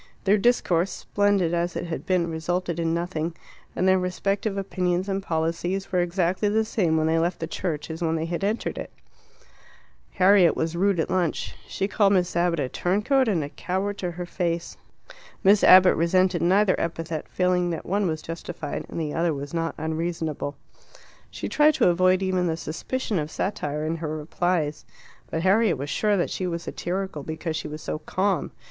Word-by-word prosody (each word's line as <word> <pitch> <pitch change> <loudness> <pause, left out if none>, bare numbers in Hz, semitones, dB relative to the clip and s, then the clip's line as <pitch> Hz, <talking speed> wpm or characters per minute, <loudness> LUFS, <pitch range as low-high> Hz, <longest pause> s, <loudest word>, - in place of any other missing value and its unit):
Their 205 +1 +4
discourse, 195 -6 +2
splendid 200 -5 +1
as 175 +1 -1
it - - -3
had 165 -1 -5
been, 180 -2 +2
resulted 170 +1 -2
in 165 -1 0
nothing, 170 -1 -2 0.4
and 185 - +1
their 190 0 +5
respective 195 +3 -1
opinions 185 -1 -1
and 195 0 -1
policies 170 +3 -2
were 180 - +2
exactly 180 +3 +1
the 220 +1 +2
same 175 -7 +1
when 155 - +2
they 160 +1 +2
left 170 +2 0
the 165 - -2
church 160 -2 -4
as 160 +2 -7
when 165 -1 +1
they 160 0 -1
had 170 +3 -3
entered 210 +3 -1
it. - - -6 1.2
Harriet 185 -2 +5
was 160 +1 -2
rude 195 0 +2
at - - -1
lunch. 180 -4 -1
She 195 - -2
called 205 -1 +3
Miss 180 -3 +1
Abbott 170 -1 +2
a 135 - 0
turncoat 210 - +1
and 180 -8 +1
a 145 - -5
coward 190 +6 -3
to 180 - -2
her 175 +1 -5
face. 170 -1 -2 0.7
Miss 200 +1 +5
Abbott 185 0 +8
resented 180 +1 +2
neither 190 +3 +4
epithet, 165 -1 -3
feeling 180 -1 +1
that 165 -2 -4
one 200 +1 0
was 155 -2 -3
justified 165 -2 -6
and - - -5
the 150 -2 -2
other 170 0 +1 0.2
not 165 -1 -1
unreasonable. 160 -2 -3 0.7
She - - -5
tried 300 0 +4
to - - +4
avoid 185 +2 +3
even 185 -1 +1
the 160 -1 -1
suspicion 195 - -3
of 150 0 -3
satire 150 -5 -2
in 165 +1 -1
her 160 -1 -4
replies. 155 -1 -1 0.5
But 160 - -2
Harriet 195 -2 +3
was 140 +3 -4
sure 210 -1 +2
that 175 - 0
she 185 - -2
was 170 -1 -3
satirical 185 -3 -4
because 160 +2 -4
she - - -3
was 150 +1 -7
so - - -3
calm. 195 +4 -1
175 Hz, 185 wpm, -25 LUFS, 165-190 Hz, 1.2 s, Abbott